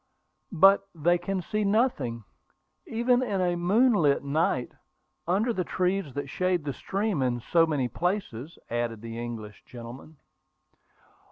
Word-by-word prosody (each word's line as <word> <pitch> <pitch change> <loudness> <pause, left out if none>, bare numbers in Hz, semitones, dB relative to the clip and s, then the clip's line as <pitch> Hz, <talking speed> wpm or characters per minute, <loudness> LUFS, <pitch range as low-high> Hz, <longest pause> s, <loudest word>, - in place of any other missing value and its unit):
"But 195 +3 +5
they 175 +3 +2
can 185 +1 -3
see 215 +3 -1
nothing, 200 - 0 0.6
even 245 +2 +2
in 205 -6 -1
a 175 -1 +1
moonlight 175 - +3
night, 140 -3 0 0.6
under 210 +7 +1
the 185 - -1
trees 180 -5 -1
that 145 0 -3
shade 180 +3 0
the 140 - -2
stream 195 - -2
in 125 -2 0
so 165 +7 +3
many 145 -5 0
places," 170 - -3
added 120 -2 -2
the 115 0 -6
English 115 -3 -7
gentleman. 125 +6 -11
170 Hz, 135 wpm, -27 LUFS, 125-195 Hz, 0.6 s, But